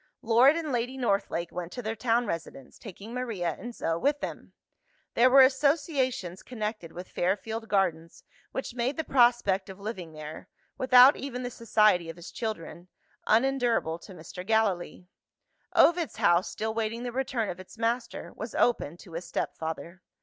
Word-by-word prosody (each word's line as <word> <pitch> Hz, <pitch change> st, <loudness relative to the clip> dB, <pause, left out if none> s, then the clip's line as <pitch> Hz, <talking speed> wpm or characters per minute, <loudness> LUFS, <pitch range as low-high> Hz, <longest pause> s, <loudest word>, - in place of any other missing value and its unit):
Lord 240 Hz, +5 st, +5 dB
and 325 Hz, -3 st, -3 dB
Lady 245 Hz, +2 st, -2 dB
Northlake 200 Hz, -7 st, -1 dB
went 175 Hz, -1 st, -5 dB
to 245 Hz, -, -6 dB
their 220 Hz, +1 st, -3 dB
town 235 Hz, +1 st, +1 dB
residence, 160 Hz, -, -6 dB
taking 210 Hz, +2 st, -10 dB
Maria 215 Hz, -10 st, -2 dB
and 240 Hz, 0 st, -8 dB
Zo 165 Hz, 0 st, -1 dB
with 285 Hz, +6 st, +1 dB
them. -, -, -7 dB, 0.6 s
There 245 Hz, +2 st, +5 dB
were 270 Hz, +1 st, +8 dB
associations 265 Hz, -, +1 dB
connected 215 Hz, -7 st, -5 dB
with 180 Hz, +2 st, -8 dB
Fairfield 220 Hz, +5 st, -2 dB
Gardens, 170 Hz, -5 st, -1 dB, 0.3 s
which 265 Hz, -, -4 dB
made 250 Hz, +4 st, -1 dB
the 320 Hz, -, -1 dB
prospect 240 Hz, -8 st, +3 dB
of 190 Hz, +1 st, -10 dB
living 190 Hz, -6 st, -6 dB
there 155 Hz, 0 st, -9 dB, 0.3 s
without 255 Hz, +1 st, +7 dB
even 255 Hz, -2 st, -5 dB
the 245 Hz, -, -4 dB
society 215 Hz, -7 st, +2 dB
of 165 Hz, -, -7 dB
his 170 Hz, -, -10 dB
children 200 Hz, -6 st, -5 dB, 0.4 s
unendurable 235 Hz, -8 st, +2 dB
to 190 Hz, +2 st, -12 dB
Mr. 175 Hz, +2 st, -9 dB
Gallilee. 195 Hz, -4 st, 0 dB, 0.7 s
Ovid's 340 Hz, -1 st, +4 dB
house, 175 Hz, +1 st, +3 dB
still 220 Hz, 0 st, -3 dB
waiting 225 Hz, +1 st, -2 dB
the 245 Hz, -, -3 dB
return 250 Hz, -3 st, -1 dB
of 175 Hz, -, -5 dB
its 185 Hz, +4 st, -12 dB
master, 230 Hz, +2 st, -2 dB
was 220 Hz, +1 st, -7 dB
open 175 Hz, -9 st, +1 dB
to 175 Hz, -2 st, -14 dB
his 170 Hz, +2 st, -5 dB
step -, -, -3 dB
father. 165 Hz, +3 st, -6 dB
220 Hz, 165 wpm, -28 LUFS, 180-250 Hz, 0.7 s, were